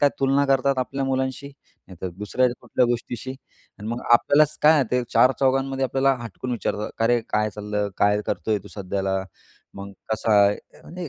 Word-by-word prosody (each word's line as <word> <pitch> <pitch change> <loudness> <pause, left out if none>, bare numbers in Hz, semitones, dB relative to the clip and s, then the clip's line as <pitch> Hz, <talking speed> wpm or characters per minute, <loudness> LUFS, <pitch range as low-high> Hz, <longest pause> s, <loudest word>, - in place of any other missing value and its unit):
काय, 145 - +5
तुलना 135 +1 +3
करतात 135 0 +2
आपल्या 135 +2 -2
मुलांशी, 130 +1 -2 0.4
नाही 90 - -12
तर 95 - -2
दुसऱ्या 115 +5 +1
कुठल्या 125 - +1
गोष्टीशी 120 +1 -3 0.5
अन् 105 - -8
मग 120 +1 -3
आपल्यालाच 150 +5 +4
काय 155 - +7
आहे 140 -4 +3
ते, 125 0 +1
चार-चौघांमध्ये 135 +2 +2
आपल्याला 135 +2 +2
हटकून 120 +3 -7
विचारतात, 105 -2 -3
का, 115 - +1
"अरे, 120 +1 +3
काय 105 0 +1
चाललं? 105 0 -3
काय 105 +1 +3
करतोय 110 -1 -1
तू - - -11
सध्याला? 95 -1 -3 0.6
मग 100 0 -8 0.2
कसा 110 0 0
आहे?" 100 +1 -2
आणि 175 -1 -7
125 Hz, 175 wpm, -23 LUFS, 105-135 Hz, 0.6 s, काय